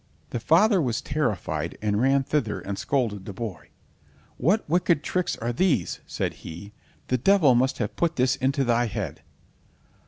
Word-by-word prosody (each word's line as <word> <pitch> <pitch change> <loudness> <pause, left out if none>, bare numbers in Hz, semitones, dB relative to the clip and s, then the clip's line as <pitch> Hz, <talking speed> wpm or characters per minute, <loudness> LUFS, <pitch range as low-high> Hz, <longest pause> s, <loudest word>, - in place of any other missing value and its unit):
The 120 - -2
father 180 - +4
was 120 -5 0
terrified, 100 - -2
and 105 0 0
ran 135 +1 +3
thither 130 -7 -1
and 100 - -5
scolded 110 -8 -1
the 100 - -6
boy. 105 -2 -6 0.7
"What 185 - +1
wicked 170 -1 +2
tricks 180 +2 -1
are 120 +1 -2
these?" 140 - +1
said - - -2
he; 100 +6 -9 0.4
"the 125 - +1
devil 170 -3 +5
must 130 +2 +2
have - - -3
put 170 -1 0
this 130 -1 +2
into 135 +2 0
thy 120 -1 +2
head." 105 - -5
130 Hz, 160 wpm, -25 LUFS, 110-155 Hz, 0.7 s, devil